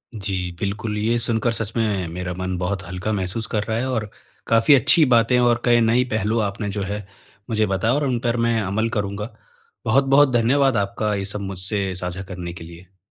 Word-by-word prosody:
जी, 95 -3 -3
बिल्कुल। 105 +1 -3
ये 115 +3 +1
सुनकर 115 0 0
सच 110 -1 -2
में 105 -6 0
मेरा 90 +2 -5
मन 95 0 -3
बहुत 95 +2 -2
हल्का 90 +4 -3
महसूस 100 +3 -3
कर 105 -2 -1
रहा 110 +1 -2
है 130 +3 -1
और 110 -5 -2 0.4
काफ़ी 115 +5 +5
अच्छी 140 +5 +5
बातें 120 -1 +3
और 120 -1 +3
कई 120 -1 +5
नई 115 +2 +3
पहलू 110 +2 0
आपने 105 0 -2
जो 100 +1 -3
है, 105 +1 -4 0.4
मुझे 110 -1 +2
बताया 100 +5 +1
और 145 +1 +1
उन 125 -3 0
पर 120 0 +1 0.3
अमल 110 +4 0
करूँगा। 105 0 -3 0.5
बहुत-बहुत 135 +1 +4
धन्यवाद 130 +2 +3
आपका 100 +1 -1
ये 100 -1 -3
सब 100 +1 -4
मुझसे 95 0 -2
साझा 90 +1 -4
करने 90 -2 -6
के 85 - -10
लिए। 85 +3 -14
105 Hz, 190 wpm, -22 LUFS, 95-115 Hz, 0.5 s, काफ़ी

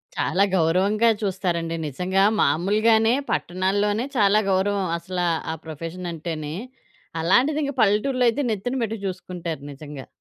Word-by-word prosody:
చాలా 195 - +1
గౌరవంగా 190 +7 +3
చూస్తారండి. 175 -4 -1
నిజంగా 180 +7 0 0.2
మామూలుగానే 215 +9 +3 0.2
పట్టణాల్లోనే 205 +5 0
చాలా 205 -1 +4
గౌరవం 195 +1 +1
అసలా 180 0 -2 0.2
ఆ - - -2
ప్రొఫెషన్ 165 +3 -6
అంటేనే. 155 -2 -5 0.7
అలాంటిది 255 - +3
ఇంకా 280 -1 -3
పల్లెటూరులో 245 +5 +2
అయితే 230 +5 -1
నెత్తిన 220 +5 -2
పెట్టి 225 0 -3
చూసుకుంటారు 180 -4 -5
నిజంగా. 145 -1 -9
190 Hz, 120 wpm, -23 LUFS, 165-215 Hz, 0.7 s, చాలా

